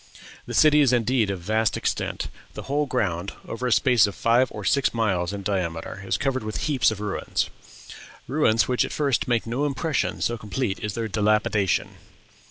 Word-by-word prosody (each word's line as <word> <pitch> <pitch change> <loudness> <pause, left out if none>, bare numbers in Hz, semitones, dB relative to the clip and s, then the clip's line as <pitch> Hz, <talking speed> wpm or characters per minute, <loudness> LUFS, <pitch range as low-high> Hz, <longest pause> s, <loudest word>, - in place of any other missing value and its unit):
"The - - -4
city 150 -1 +6
is 135 -4 +4
indeed 120 -2 +2
of 95 -3 -3
vast 110 +4 +1
extent... - - -2 0.3
the - - -6
whole 145 +2 -1
ground, 100 -8 -1
over 125 +2 -3
a - - -1
space 120 -3 +4
of 100 - -6
five 120 +3 +3
or 105 -2 -7
six 140 0 +2
miles 95 -6 0
in 100 -1 -6
diameter, 90 -1 -3
is 95 - -1
covered 135 -3 -1
with 110 0 -4
heaps 145 -5 +3
of 110 -2 -5
ruins 105 -2 -2 0.8
ruins 120 -5 +2
which 125 -1 +2
at - - -4
first 145 0 0
make 120 -2 +1
no 120 +5 -2
impression, 145 0 -1
so 120 -1 -1
complete 105 -1 -3
is 105 -2 -4
their 115 -1 -2
dilapidation." 105 -2 +1
115 Hz, 180 wpm, -24 LUFS, 100-130 Hz, 0.8 s, city